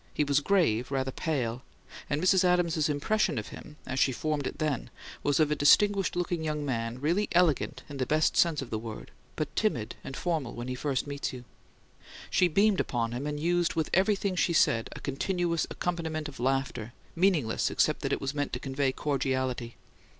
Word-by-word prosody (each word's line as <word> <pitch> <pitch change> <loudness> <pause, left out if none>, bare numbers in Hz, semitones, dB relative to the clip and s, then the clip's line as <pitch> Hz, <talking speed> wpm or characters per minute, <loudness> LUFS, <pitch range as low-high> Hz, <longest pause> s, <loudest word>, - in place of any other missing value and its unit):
He 150 - +2
was 140 0 +3
grave, 150 - +2
rather 135 -1 -1
pale; 125 -6 -2 0.5
and 145 - 0
Mrs. 190 0 +5
Adams's 170 -4 +2
impression 150 +3 +1
of 105 - -4
him, 150 - -11
as 130 0 -3
she 135 - +4
formed 150 +2 -2
it - - -6
then, 150 -6 -1 0.3
was 145 +1 +1
of 155 -1 +3
"a - - +2
distinguished 195 +7 +4
looking 175 -2 -1
young 150 -1 -2
man, 115 -2 -2
really 170 +9 +1
elegant 170 -5 +2
in 145 - -8
the 130 -2 -1
best 155 +1 +2
sense 160 -5 +3
of 130 - -11
the 110 - -1
word, 110 -1 -8 0.2
but 150 -1 -3
timid 125 - 0
and 135 - -7
formal 160 -8 -2
when 120 +1 -5
he 130 - -2
first 135 0 -1
meets 140 -1 -3
you." 125 -1 -8 0.9
She 180 - +4
beamed 200 +4 +3
upon 115 -2 -1
him, 125 +5 -3
and 150 0 -3
used 175 +2 +1
with 160 -2 -1
everything 195 0 +2
she 175 - +1
said 115 -7 +3
a - - -8
continuous 170 +4 -1
accompaniment 160 -3 -3
of 145 - -10
laughter, 130 -3 -1 0.2
meaningless 165 - +2
except - - +1
that - - -2
it - - 0
was 135 +1 -2
meant 145 -1 -2
to 125 - -2
convey 135 0 0
cordiality. 130 -4 -2
145 Hz, 195 wpm, -29 LUFS, 130-170 Hz, 0.9 s, Mrs